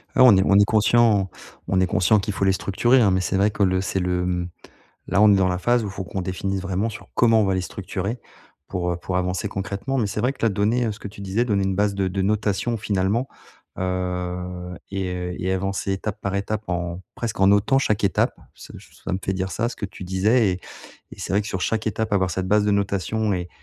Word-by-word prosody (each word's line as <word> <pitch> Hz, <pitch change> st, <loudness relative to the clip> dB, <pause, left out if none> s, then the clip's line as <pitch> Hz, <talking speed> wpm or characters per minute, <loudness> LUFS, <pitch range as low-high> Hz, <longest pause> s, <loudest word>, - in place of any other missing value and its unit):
Ouais, -, -, +4 dB
on 125 Hz, -5 st, +8 dB
y -, -, +4 dB
on 100 Hz, -, +5 dB
y 100 Hz, -, +7 dB
conscient 110 Hz, -2 st, +3 dB, 0.4 s
on 95 Hz, -, +2 dB
est 95 Hz, -, +2 dB
conscient 95 Hz, +4 st, +3 dB
qu'il 100 Hz, +1 st, -3 dB
faut 95 Hz, -, 0 dB
les 95 Hz, -, +4 dB
structurer, 120 Hz, +7 st, +2 dB
hein, 100 Hz, -4 st, +4 dB
mais, 95 Hz, 0 st, +2 dB
c'est 95 Hz, +1 st, -1 dB
vrai 100 Hz, +2 st, +3 dB
que 105 Hz, -, 0 dB
le 95 Hz, -1 st, +2 dB
c'est 95 Hz, 0 st, -1 dB
le, 90 Hz, 0 st, 0 dB
hem 90 Hz, -1 st, -2 dB, 0.6 s
là, 100 Hz, -, +2 dB
on 105 Hz, -1 st, +7 dB
est -, -, +5 dB
dans 95 Hz, -1 st, +3 dB
la 90 Hz, 0 st, -1 dB
phase 120 Hz, +5 st, +2 dB
où 100 Hz, -, -4 dB
faut 95 Hz, 0 st, -6 dB
qu'on 95 Hz, +1 st, -4 dB
définisse 95 Hz, +1 st, -2 dB
vraiment 95 Hz, +3 st, -1 dB
sur, 110 Hz, -1 st, -9 dB
comment 115 Hz, -2 st, +4 dB
on -, -, +3 dB
va 95 Hz, -1 st, +1 dB
les 95 Hz, -, 0 dB
structurer, 100 Hz, +5 st, -4 dB, 0.5 s
pour, 90 Hz, -2 st, -1 dB
heu, -, -, -2 dB
pour 90 Hz, +1 st, -4 dB
avancer 90 Hz, +2 st, -1 dB
concrètement, 100 Hz, +7 st, -3 dB
mais, 115 Hz, -, +1 dB
c'est 100 Hz, -, -3 dB
vrai 125 Hz, +4 st, +1 dB
que -, -, -17 dB
là, -, -, +5 dB
donner, 110 Hz, +5 st, +1 dB
heu 110 Hz, -, -1 dB
ce 105 Hz, -, -11 dB
que -, -, -6 dB
tu 100 Hz, -, -13 dB
disais, 100 Hz, +4 st, 0 dB
donner 100 Hz, -5 st, +1 dB
une 95 Hz, 0 st, 0 dB
base 100 Hz, +1 st, +1 dB
de 100 Hz, -1 st, 0 dB
de 95 Hz, +1 st, -2 dB
notation, 105 Hz, +2 st, 0 dB
finalement, 105 Hz, +4 st, 0 dB, 0.5 s
heu 90 Hz, -1 st, -3 dB
et 95 Hz, -1 st, -2 dB
heu 90 Hz, 0 st, -4 dB
et 95 Hz, +1 st, 0 dB
avancer 95 Hz, +1 st, -1 dB
étape 95 Hz, +1 st, -4 dB
par 100 Hz, -1 st, -3 dB
étape 105 Hz, +2 st, -2 dB
en 85 Hz, 0 st, -3 dB
presque, 115 Hz, -5 st, -4 dB
en 95 Hz, -, +6 dB
notant 100 Hz, +7 st, +4 dB
chaque 110 Hz, -6 st, 0 dB
étape. 95 Hz, -, +2 dB, 0.2 s
Ce -, -, -13 dB
ç -, -, -19 dB
ça -, -, -3 dB
me 95 Hz, -, 0 dB
fait 95 Hz, -, 0 dB
dire 95 Hz, 0 st, -2 dB
ça, 115 Hz, +4 st, -1 dB
ce 120 Hz, -, -8 dB
que 100 Hz, -, -4 dB
tu 95 Hz, -, -10 dB
disais 100 Hz, +5 st, +2 dB
et 90 Hz, 0 st, -3 dB, 0.5 s
et -, -, -11 dB
c'est -, -, -4 dB
vrai 100 Hz, -, +3 dB
que -, -, -9 dB
sur 95 Hz, -, -3 dB
chaque 110 Hz, +4 st, -1 dB
étape 110 Hz, +1 st, -2 dB
avoir 95 Hz, -2 st, +2 dB
cette 95 Hz, +1 st, -2 dB
base 105 Hz, +1 st, +3 dB
de 105 Hz, -, +2 dB
notation 100 Hz, +2 st, 0 dB
et 90 Hz, -2 st, -2 dB
95 Hz, 255 wpm, -23 LUFS, 95-105 Hz, 0.6 s, on